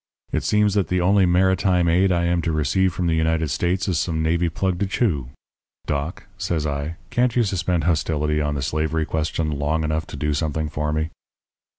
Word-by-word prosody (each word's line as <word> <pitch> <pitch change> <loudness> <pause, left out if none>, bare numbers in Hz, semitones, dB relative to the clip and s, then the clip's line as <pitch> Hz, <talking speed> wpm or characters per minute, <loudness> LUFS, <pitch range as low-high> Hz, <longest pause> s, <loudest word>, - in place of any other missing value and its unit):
It - - 0
seems 105 -1 +2
that 100 -3 +1
the 90 - 0
only 95 +1 +4
maritime 90 0 +3
aid 90 +3 +3
I 85 -1 +1
am 85 0 +1
to 85 - -1
receive 80 +5 +1
from 90 0 -3
the 85 - +2
United 80 -1 +1
States 90 +8 0
is 90 -5 +1
some 80 -2 -1
navy 85 +2 +1
plug 90 +1 -1
to 100 - 0
chew. 85 - 0 0.6
Doc,' 75 +3 -3 0.2
says 85 -6 -1
I, 70 +2 -3 0.2
'can't 120 -1 +1
you 120 - +4
suspend 90 -4 0
hostility 75 -2 +1
on 75 -1 -1
the 70 - -2
slavery 80 +3 -1
question 80 0 -1
long 80 +2 0
enough 75 0 -1
to - - -8
do 75 +1 0
something 75 +1 -1
for 75 0 -2
me?' 80 +1 -1
80 Hz, 200 wpm, -22 LUFS, 75-90 Hz, 0.6 s, only